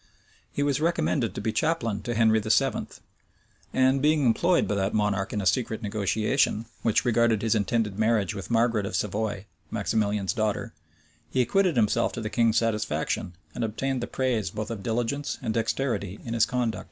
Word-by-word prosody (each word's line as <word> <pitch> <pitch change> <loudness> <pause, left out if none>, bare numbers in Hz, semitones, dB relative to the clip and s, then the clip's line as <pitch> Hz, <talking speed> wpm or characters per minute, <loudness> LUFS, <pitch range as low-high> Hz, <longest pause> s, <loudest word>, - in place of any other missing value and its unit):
[*] - - -33
He 145 - -1
was 145 0 0
recommended 155 -7 0
to - - -4
be 110 - -1
chaplain 130 -11 0
to 120 +3 -3
Henry 110 -1 +4
VII.; 110 0 +1 0.8
and 130 +1 +3
being 150 -1 +3
employed 170 +10 +3
by - - 0
that 100 0 0
monarch 105 -1 0
in 105 - -1
a - - -4
secret 115 +1 0
negotiation, 110 +3 0 0.2
which 115 +2 +2
regarded 115 -2 +2
his 115 - +2
intended 105 -1 0
marriage 110 -3 +2
with 95 -5 -7
Margaret 115 -3 +2
of 110 - -4
Savoy, 105 -1 -2 0.2
Maximilian's 105 -3 0
daughter, 110 -3 -2 0.6
he 130 - -1
acquitted 180 +7 +2
himself 110 -4 +2
to - - -4
the 110 0 -4
king's 115 -2 +2
satisfaction, 105 -7 -1 0.2
and 120 - -3
obtained 125 +4 -2
the 120 - -3
praise 125 -5 -1
both 110 +1 -5
of 110 -3 -5
diligence 120 +6 -2
and 110 - -2
dexterity 115 -4 -1
in 115 - -4
his 115 -1 +3
conduct. 120 -6 -1
115 Hz, 175 wpm, -26 LUFS, 105-125 Hz, 0.8 s, Henry